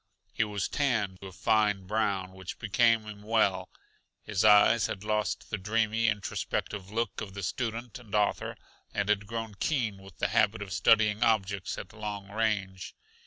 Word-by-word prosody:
He - - +2
was 105 -2 -2
tanned 110 -10 0
a 95 -1 -8
fine 105 0 +1
brown, 100 -2 0
which 95 -1 -8
became 115 +1 +3
him 105 -1 -9
well. 100 -4 +1 0.5
His 100 -3 -1
eyes 105 +1 +6
had 95 - -5
lost 105 0 -1
the 110 - -1
dreamy, 110 +3 +1
introspective 100 -2 -2
look 115 0 -2
of 95 -2 -7
the 100 - -5
student 115 +5 -3
and 110 -4 -7
author, 105 -1 0 0.4
and 100 0 0
had 105 -1 +1
grown 115 -1 -4
keen 115 -10 -1
with 95 -2 -14
the - - 0
habit 100 - +2
of 95 -1 -7
studying 105 +1 +4
objects 100 -5 +1
at - - -8
long 105 -2 -6
range. 105 -4 -2
105 Hz, 165 wpm, -29 LUFS, 100-110 Hz, 0.5 s, eyes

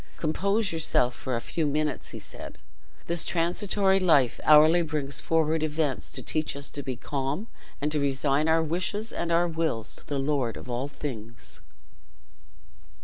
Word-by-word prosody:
"Compose 200 +6 0
yourself 140 -6 +2
for 130 0 -3
a - - 0
few 160 +4 -1
minutes," 150 0 -1 0.2
said - - -8
he; - - -28 0.4
"this 170 -1 +1
transitory 190 +3 +2
life 150 -9 +3
hourly 155 +3 +7
brings 150 -4 -2
forward 160 -1 +1
events 155 -3 -1
to - - -6
teach 155 -2 -1
us 140 0 -5
to 145 - -5
be 130 -2 -4
calm, 140 - -3 0.3
and 150 +1 -1
to 150 - +1
resign 140 +2 +1
our 160 0 +4
wishes 185 +7 -2
and 170 0 -2
our 170 +1 +3
wills 160 -9 -2
to - - -16
the 145 - -2
Lord 135 -4 0
of - - -10
all 125 +2 -2
things." 115 -6 -7
155 Hz, 160 wpm, -27 LUFS, 140-165 Hz, 0.4 s, hourly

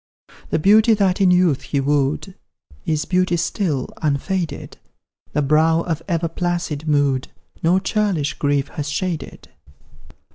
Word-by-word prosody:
The - - +1
beauty 215 +6 +5
that 195 -2 +1
in 190 - +5
youth 180 -6 +3
he 140 - -2
wooed, 145 +6 0 0.5
Is 155 -1 0
beauty 185 -1 +1
still, 165 - -1
unfaded; 155 +2 -2 0.5
The 150 - +1
brow 160 +3 +3
of 165 -2 -3
ever 170 -2 0
placid 170 -3 -3
mood 140 -3 +1 0.3
No 170 +3 +3
churlish 190 -6 0
grief 145 -1 0
has 145 -3 -5
shaded. 165 +2 -4
165 Hz, 130 wpm, -20 LUFS, 145-185 Hz, 0.5 s, beauty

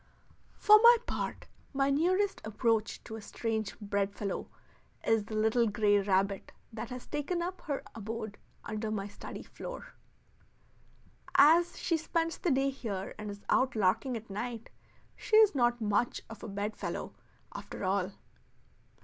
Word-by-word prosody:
For 425 0 +8
my 475 +1 +9
part, - - -4 0.3
my 275 0 +2
nearest 370 +7 +2
approach 220 0 0
to 220 - -7
a - - -8
strange 220 0 -3
bedfellow 200 -1 -2 0.6
is 225 -2 +2
the 215 - -6
little 220 +2 +3
gray 205 -1 +3
rabbit 195 0 0 0.2
that 225 +1 -5
has 250 -1 -7
taken 310 +4 -2
up 360 +1 -5
her 285 -2 -2
abode 220 -1 -6 0.2
under 215 0 -3
my 205 -2 -2
study 205 - -8
floor. - - -8 1.4
As 330 +5 +6
she 335 - +1
spends 330 +1 -1
the 350 - 0
day 275 -1 +2
here 205 -8 -5
and 210 0 -5
is 200 0 -8
out 260 -1 +2
larking 220 +5 +1
at 225 +1 -10
night, 230 +3 -5 0.4
she - - 0
is 435 -2 +7
not 240 -3 +2
much 215 +2 0
of 225 - -9
a - - -6
bedfellow 205 +1 -4 0.4
after - - -7
all. 190 0 0
225 Hz, 145 wpm, -31 LUFS, 205-280 Hz, 1.4 s, my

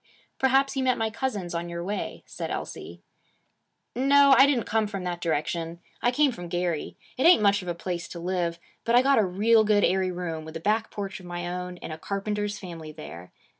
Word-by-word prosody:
'Perhaps 270 +1 +3
you 265 - 0
met 255 -1 +2
my 225 -1 -1
cousins 210 -8 -3
on 170 0 -3
your 170 0 -4
way,' 200 +3 -4
said - - -6
Elsie. - - -6 0.9
'No. 280 +2 +6
I 270 - +7
didn't 260 -5 +2
come 220 -1 +1
from 200 -3 -5
that 175 -1 -4
direction. 165 +1 -2 0.2
I 240 - +3
came 280 +3 +3
from 175 -7 -8
Gary. 175 -2 -2 0.2
It 265 - +5
ain't 345 -11 +7
much 200 0 +4
of 180 - -10
a 175 - -2
place 170 0 -4
to 170 - -8
live. 175 -1 -1 0.3
But 230 - +2
I 245 - +6
got 275 -2 +4
a - - +4
real 215 +5 +4
good 210 -1 +3
airy 190 0 +2
room, 175 -3 -4
with 160 +1 -7
a - - -8
back 215 +5 0
porch 195 -2 -5
of 180 - -12
my 175 0 -4
own, 180 0 -5
in 165 - -8
a 155 - -7
carpenter's 205 +2 -2
family 165 -5 -8
there. 90 - -10
190 Hz, 215 wpm, -26 LUFS, 170-225 Hz, 0.9 s, I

